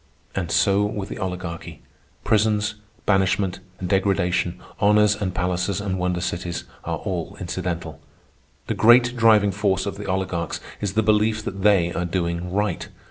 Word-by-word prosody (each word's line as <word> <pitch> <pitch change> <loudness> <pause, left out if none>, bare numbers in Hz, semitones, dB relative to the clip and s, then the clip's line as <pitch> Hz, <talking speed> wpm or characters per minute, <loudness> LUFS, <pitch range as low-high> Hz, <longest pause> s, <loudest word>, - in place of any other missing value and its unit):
And 90 -3 -2
so 95 +4 +3
with 105 -1 -3
the - - -6
Oligarchy. 90 -3 -5 0.4
Prisons, 105 0 +2 0.3
banishment 95 -1 +2 0.2
and 90 - -4
degradation, 95 -2 +1 0.2
honors 105 0 +4
and 100 -3 -2
palaces 90 +1 0
and 95 -2 -2
wonder 90 -1 0
cities, 85 -1 -3 0.2
are 85 0 -2
all 90 +1 -4
incidental. 90 -2 -4 0.7
The - - -1
great 120 +2 +5
driving 110 -4 +5
force 95 -1 0
of 100 - -4
the 105 - -7
oligarchs 95 -3 -2 0.2
is 100 -2 -2
the 110 +1 +2
belief 110 +1 +2
that 100 0 -5
they 95 -4 +4
are 90 - -1
doing 85 0 -2
right. 105 +1 -1
95 Hz, 150 wpm, -23 LUFS, 90-105 Hz, 0.7 s, great